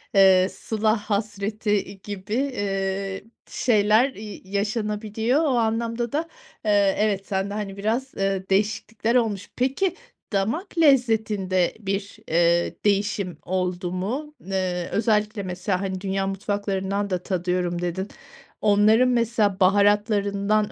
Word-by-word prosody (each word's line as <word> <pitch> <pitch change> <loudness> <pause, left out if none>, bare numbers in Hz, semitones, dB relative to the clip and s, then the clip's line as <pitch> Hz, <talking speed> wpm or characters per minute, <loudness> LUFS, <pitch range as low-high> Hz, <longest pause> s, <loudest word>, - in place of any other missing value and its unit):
eee, 190 -1 +6
sıla 215 +1 0
hasreti, 210 0 -2
iii, 200 -1 -1
gibi, 205 +1 -6
eee, 195 -6 -2 0.3
şeyler, 215 +2 +3
iii, 210 -2 -9
yaşanabiliyor. 215 +4 0
O - - +2
anlamda 230 +1 0
da, 320 +3 -1 0.4
eee, 205 -2 +3
evet 200 -2 0
sende, 195 0 -1
hani, 205 -2 -4
biraz, 230 +6 -1
eee, 195 -1 -1
değişiklikler 215 +3 0
olmuş. 215 -5 0
Peki, 270 +9 0 0.4
damak 265 - -1
lezzetinde 220 - +3
bir, 195 -1 -3
eee, 170 +1 +2
değişim 200 -4 0
oldu 180 -1 -2
mu? 260 +12 -3
N 195 - -14
eee, 180 -2 -1
özellikle, 215 -1 +1
mesela, 185 0 -2
hani, 190 -1 -3
dünya 195 0 -1
mutfaklarından 200 0 -2
da 180 -1 -2
tadıyorum 180 -1 -1
dedin. 175 +2 -2 0.5
Onların 215 +4 +5
mesela 230 -5 +1
baharatlarından 205 +1 +2
205 Hz, 120 wpm, -24 LUFS, 195-220 Hz, 0.5 s, eee